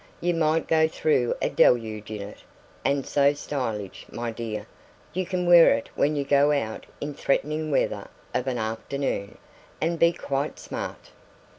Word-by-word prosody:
"You 175 0 +1
might 160 -1 +1
go 160 0 +4
through 150 -6 +1
a - - +2
deluge 110 -3 +2
in 105 -2 -5
it. 100 - -10 0.4
And 140 -1 +1
so 140 0 +3
stylish, 115 -9 -4
my 120 0 -3
dear! 110 -2 -5 0.5
You 185 0 -2
can 180 -1 -1
wear 175 -5 +8
it 115 - -5
when 150 +1 +1
you 145 - 0
go 140 +1 +4
out 115 -7 -2
in 145 0 -4
threatening 150 +2 0
weather 145 - 0 0.3
of 125 - -1
an 125 -2 0
afternoon, 110 -1 -3 0.4
and 165 +1 0
be 170 0 +6
quite 140 -3 -3
smart." - - -7
140 Hz, 160 wpm, -26 LUFS, 115-155 Hz, 0.5 s, wear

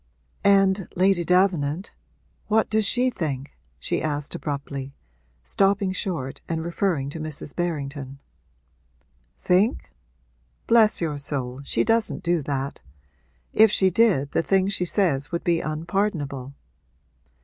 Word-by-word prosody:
'And, 195 -1 +4
Lady 185 -1 +3
Davenant, 180 -2 +1 0.6
what 220 0 +2
does 215 -1 +2
she 255 +1 +2
think?' 145 - -4 0.2
she 65 - -2
asked 145 -2 -2
abruptly, 140 -2 -5 0.5
stopping 195 - +1
short 165 -9 -4
and 160 -1 -2
referring 170 -5 -1
to 160 - -7
Mrs. 155 -2 -4
Berrington. 140 -5 -3 1.2
'Think? 190 +6 +1 0.7
Bless 225 -4 +4
your 150 -4 -2
soul, 135 -2 -4
she - - 0
doesn't 225 0 +1
do 170 -1 +1
that! 140 -1 -4 0.7
If 220 0 +6
she 190 -2 +3
did, 180 -9 +3
the - - +1
things 195 +3 +1
she 180 - 0
says 165 -7 +1
would 170 - -2
be 170 -1 +1
unpardonable.' 155 -5 -2
170 Hz, 120 wpm, -24 LUFS, 140-195 Hz, 1.2 s, If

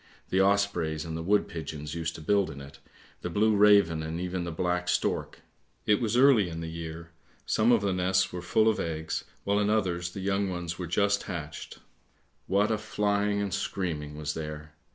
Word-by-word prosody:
The 95 - +3
ospreys 95 -6 +1
and 80 -1 -5
the 80 - -3
wood 100 +5 +2
pigeons 75 -2 -6
used 85 -1 -3
to - - -8
build 100 +4 +2
in 70 - -8
it, 70 0 -12 0.4
the - - -3
blue 105 +4 +2
raven 100 -6 +5
and 80 +1 -4
even 90 0 -3
the 85 - -4
black 90 +1 -1
stork! - - -1 0.4
It 105 +3 +3
was 115 0 +1
early 125 -8 +5
in 80 -1 -6
the 80 0 -5
year, 85 0 -7 0.3
some 110 +3 +3
of 115 -3 +4
the 100 -2 0
nests 95 +1 +1
were 90 - -4
full 110 +5 +2
of 110 - +2
eggs, 80 -1 -3 0.2
while 100 +1 +1
in 105 0 +1
others 90 -5 0
the - - -6
young 100 0 0
ones 85 -1 -4
were 90 - -3
just 100 +4 +2
hatched. 80 -5 -6 0.7
What 100 +3 +2
a 110 - 0
flying 105 -1 0
and 100 -3 -3
screaming 75 -6 -3
was 75 0 -3
there! 75 -1 -7
90 Hz, 195 wpm, -28 LUFS, 80-100 Hz, 0.7 s, raven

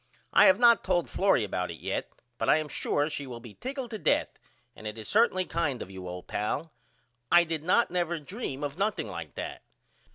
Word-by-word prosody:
I - - +8
have 280 - +6
not 235 -1 +6
told 175 -2 +1
Florrie 195 - +2
about 90 -3 -2
it 85 - -7
yet - - -3 0.3
but - - 0
I - - +6
am 155 -1 -2
sure 145 0 0
she 145 -3 -5
will 120 -2 -7
be 115 -3 -11
tickled 260 - -5
to 220 - -4
death - - +2 0.5
and 110 - -8
it 105 +1 -6
is 110 - -7
certainly 205 -4 +3
kind 145 -8 -1
of 95 - -7
you 95 -1 -8
old 90 0 -7
pal. 145 +10 -3 0.6
I 175 0 +8
did 165 -2 -3
not 180 +8 +3
never 175 -2 0
dream 150 - -5
of 145 +4 -4
nothing 205 +1 0
like 85 -5 -7
that. - - -5
155 Hz, 215 wpm, -29 LUFS, -, 0.6 s, I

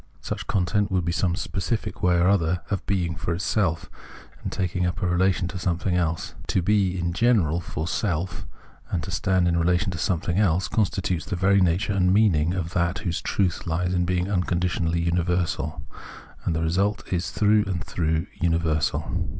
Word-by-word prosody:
Such - - -4
a - - -8
content 100 +2 +1
would 95 -3 0
be 85 - 0
some 85 0 0
specific - - -3
way 90 -1 +3
or 85 +1 +3
other 90 -3 +2
of 95 -3 -1
being 90 -4 0
for 85 +1 -2
itself 90 -3 0 0.5
and - - -4
taking 90 -2 -1
up 90 +2 -1
a - - +2
relation 90 0 +2
to 90 - -6
some 85 -2 0
thing 90 0 -1
else. 85 -2 -1
But - - -15
to 95 - +1
be 100 -2 +2
in 85 -1 -1
general 95 -7 +2
for 80 -1 -4
self 90 -1 -2 0.4
and 80 - -2
to - - -6
stand 95 -2 +1
in 85 0 +2
relation 90 +3 +2
to 85 - -5
something 85 +2 0
else 95 -3 +2
constitutes 95 -5 0
the 100 - -3
very 100 +2 +3
nature 90 +3 +2
and 90 -2 +3
meaning 90 -5 +3
of 85 -2 -3
that 85 +1 +1
whose 85 -2 -1
truth 90 -1 -1
lies 90 +2 0
in 90 -1 +1
being 90 0 0
unconditionally 90 -3 0
universal; 85 -2 -1 0.6
and 80 - 0
the 80 - 0
result 95 +6 +1
is 90 0 -1
through 105 +4 +3
and 90 -4 -3
through 80 0 -1
universal. 80 -3 0
90 Hz, 190 wpm, -25 LUFS, 85-95 Hz, 0.6 s, way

